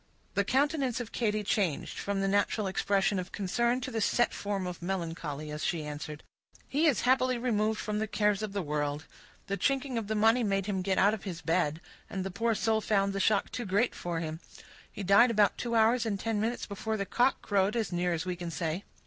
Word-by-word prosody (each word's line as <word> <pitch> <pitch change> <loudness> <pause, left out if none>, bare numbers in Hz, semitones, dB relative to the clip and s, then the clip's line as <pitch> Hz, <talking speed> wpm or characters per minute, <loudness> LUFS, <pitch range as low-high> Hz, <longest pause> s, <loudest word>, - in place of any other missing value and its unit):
The 200 - +2
countenance 270 +1 +1
of 235 -2 -6
Katy 215 -3 0
changed, 195 -6 -1
from 200 -1 -1
the 195 - +1
natural 205 +2 +1
expression 195 +1 +1
of 180 +1 -6
concern, 235 +6 0
to 255 - -4
the 225 -2 -2
set 240 +3 +2
form 200 -2 -3
of 180 -1 -6
melancholy, 165 -5 -4
as 150 +1 -5
she 165 -3 -1
answered,— 150 0 -6 0.4
"He 305 +4 +2
is 285 - +3
happily 255 0 +3
removed 220 -3 0
from 210 0 -2
the 220 - -1
cares 210 -1 +1
of 215 -2 -3
the 200 -1 -2
world; 145 0 -2 0.4
the 200 - -2
chinking 270 -2 0
of 215 - -6
the 220 - -1
money 225 +3 +4
made 195 -2 0
him 195 -2 -1
get 190 0 0
out 205 +2 +5
of 220 - -4
his 175 -4 -6
bed, 165 -2 +1 0.3
and 190 -1 -3
the 195 - -4
poor 225 +4 0
soul 220 0 +1
found 200 -2 +1
the 195 - -2
shock 200 +1 +2
too 245 - -3
great 205 +6 +2
for 170 -2 -3
him. 160 0 -4 0.5
He 200 - -6
died 200 +6 +6
about 210 -3 +3
two 235 -1 -2
hours 225 +2 +4
and 200 -3 -1
ten 225 -1 -1
minutes 230 +3 -1
before 215 +2 -3
the 200 - -2
cock 245 +7 +2
crowed, 200 +1 +1
as 225 -4 -1
near 175 0 +1
as 165 0 -2
we 180 -1 -2
can 175 -1 -5
say." 165 +2 -3
200 Hz, 225 wpm, -30 LUFS, 180-225 Hz, 0.5 s, died